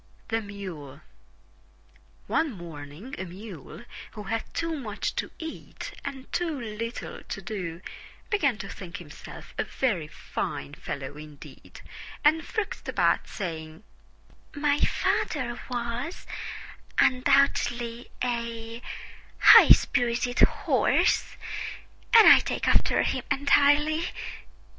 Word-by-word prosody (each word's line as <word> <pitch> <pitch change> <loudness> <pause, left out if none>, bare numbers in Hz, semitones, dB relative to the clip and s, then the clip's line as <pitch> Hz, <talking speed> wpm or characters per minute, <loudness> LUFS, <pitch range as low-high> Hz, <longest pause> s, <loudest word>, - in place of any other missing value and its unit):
THE 225 -1 +1
MULE 185 -9 -8 1.3
One 320 -3 +1
morning 170 - -9
a - - -2
Mule, 185 - -10 0.3
who 210 - -7
had 225 +2 -3
too 330 -1 -2
much 220 -8 -3
to - - -1
eat 320 -1 -7
and 265 -1 -6
too 330 -5 -1
little 230 +1 -5
to - - -6
do, 180 -6 -5 0.5
began 285 - +2
to 195 - -6
think 190 -2 -8
himself 160 -5 -11
a - - +3
very 195 - -1
fine 70 - -5
fellow 140 +1 -6
indeed, 150 -1 -12 0.4
and 310 +2 +5
frisked 435 +6 -4
about - - +2
saying, 160 -2 -6 0.7
"My 290 0 +2
father 245 -5 0
was 245 +6 -3 0.7
undoubtedly 245 -2 +2
a 235 -1 -3 0.6
high - - +9
spirited 245 -1 +3
horse - - +3 0.8
and 450 - +10
I - - +10
take - - -2
after - - +3
him - - -1
entirely." 290 +3 +4
230 Hz, 105 wpm, -27 LUFS, 180-275 Hz, 1.3 s, and